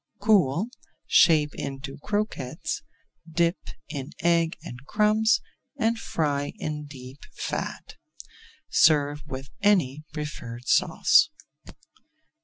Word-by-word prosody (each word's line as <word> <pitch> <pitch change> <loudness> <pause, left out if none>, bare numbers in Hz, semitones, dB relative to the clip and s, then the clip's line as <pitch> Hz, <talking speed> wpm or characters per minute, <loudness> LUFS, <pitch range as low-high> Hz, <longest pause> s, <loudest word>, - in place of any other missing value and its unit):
Cool, 200 - +3 0.4
shape 150 -3 +5
into 135 0 -6
croquettes, 205 - -3 0.5
dip 170 +2 +1 0.3
in 140 -1 -5
egg 170 -1 +2
and 125 +2 -9
crumbs, 215 +1 +3 0.4
and 225 0 +1
fry 145 -6 -1
in 150 -1 -5
deep 130 -1 -11 0.2
fat. - - -5 0.7
Serve 145 -1 +4
with 135 0 -7
any 160 -9 +2
preferred 125 -6 -6
sauce. 315 - +4
150 Hz, 90 wpm, -26 LUFS, 140-200 Hz, 0.7 s, shape